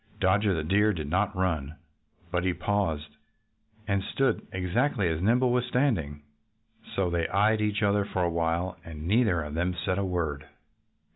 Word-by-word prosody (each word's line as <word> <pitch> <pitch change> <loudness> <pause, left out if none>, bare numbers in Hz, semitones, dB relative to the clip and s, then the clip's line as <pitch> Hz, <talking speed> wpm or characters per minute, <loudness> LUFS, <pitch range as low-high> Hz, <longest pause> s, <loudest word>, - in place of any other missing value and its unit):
Dodger 95 +1 +3
the 80 - -2
Deer 105 +6 +3
did 80 -5 -4
not 100 +2 +1
run. 80 -6 -1 0.6
But 90 -1 0
he 90 -1 0
paused 80 -8 -2 0.7
and 100 -2 +1
stood 135 +1 0
exactly 95 +4 0
as 80 0 -2
Nimble 120 +5 +3
was 125 0 +2
standing. 100 - 0 0.7
So 95 -3 +1
they 85 -1 0
eyed 105 +2 +2
each 105 0 0
other 100 0 +3
for 95 -2 -2
a - - +2
while. 85 +2 -1
And 80 -1 -8
neither 105 -5 +3
of 75 0 -7
them 90 +3 -1
said 90 +2 -1
a - - 0
word. 80 -6 -2
95 Hz, 165 wpm, -28 LUFS, 85-105 Hz, 0.7 s, Dodger